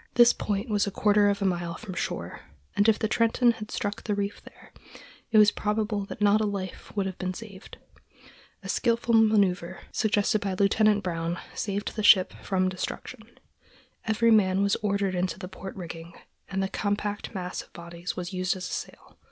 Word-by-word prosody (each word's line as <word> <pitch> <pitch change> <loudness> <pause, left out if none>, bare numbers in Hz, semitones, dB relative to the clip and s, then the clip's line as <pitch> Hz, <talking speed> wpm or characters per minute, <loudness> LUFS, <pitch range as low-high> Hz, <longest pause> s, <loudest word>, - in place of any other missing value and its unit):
This 240 -1 +7
point 205 +2 -2
was 205 -2 +1
a - - +1
quarter 205 +1 +3
of 200 0 -1
a - - +1
mile 175 -2 -1
from 210 -5 -8
shore, - - -4 0.4
and 205 +2 +4
if 220 - +4
the 220 - 0
Trenton 230 +2 +3
had 215 -2 -8
struck 205 0 -3
the 210 - -1
reef 200 0 -3
there, - - -17 0.6
it 225 - +3
is 210 -1 +7
probable 210 -1 -1
that 205 - -5
not 205 +1 +5
a - - +1
life 195 -3 -5
would 200 - +1
have 190 -1 -5
been 185 0 -3
saved. 200 -4 -10 0.9
A - - -7
skilful 235 -1 +1
manœuver, 200 -5 +3
suggested 215 -1 +1
by 195 -2 -2
Lieutenant 205 +1 +3
Brown, 170 -1 -2 0.2
saved 205 0 -3
the 215 - -2
ship 190 -3 +6
from 185 -1 0
destruction. 185 0 -6 0.7
Every 230 +1 +3
man 195 -3 +4
was 200 - +2
ordered 200 -2 0
into 180 0 -1
the 185 - -7
port 190 +1 -9
rigging, 170 -2 -8 0.4
and 195 0 -1
the - - 0
compact 205 +1 -3
mass 180 -1 -4
of - - -18
bodies 170 +1 -7
was 180 +1 -5
used 185 0 0
as 185 -1 -5
a - - -6
sail. - - -7
200 Hz, 190 wpm, -27 LUFS, 185-215 Hz, 0.9 s, This